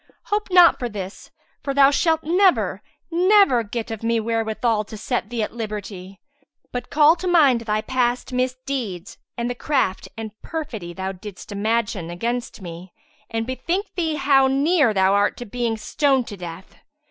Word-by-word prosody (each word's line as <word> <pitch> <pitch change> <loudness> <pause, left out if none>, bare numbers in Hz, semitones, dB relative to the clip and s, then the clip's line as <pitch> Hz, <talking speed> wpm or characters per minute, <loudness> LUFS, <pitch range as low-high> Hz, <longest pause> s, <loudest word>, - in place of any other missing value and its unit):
Hope 420 0 0
not 360 -2 +6
for 245 - -3
this, 195 -2 -7 0.3
for 275 -1 -3
thou 280 0 +6
shalt 320 +2 +2
never, 360 +4 +2 0.3
never 365 - +5
get 225 +2 -5
of 225 - -5
me 230 0 +1
wherewithal 225 0 0
to 215 - -9
set 230 0 -2
thee 235 -2 -2
at - - -4
liberty; 205 -4 -6 0.5
but 245 -1 -5
call 305 +2 +5
to 370 - -4
mind 290 -9 +4
thy 215 -1 -1
past 250 +1 -1
misdeeds 250 -6 -3 0.2
and 235 0 -1
the 245 - -2
craft 260 -7 -1
and 220 -1 -5
perfidy 230 - -5
thou 190 +2 -4
didst 195 +2 -10
imagine 205 -4 -1
against 235 +6 -3
me 175 +1 -9 0.4
and 225 0 -2
bethink 345 - -3
thee 325 -4 -1
how 270 -2 +4
near 280 0 +3
thou 190 -1 +3
art 200 0 +2
to 245 - -6
being 235 0 -2
stoned 270 +3 +1
to 205 - -7
death. 180 0 -9
235 Hz, 165 wpm, -22 LUFS, 210-280 Hz, 0.5 s, not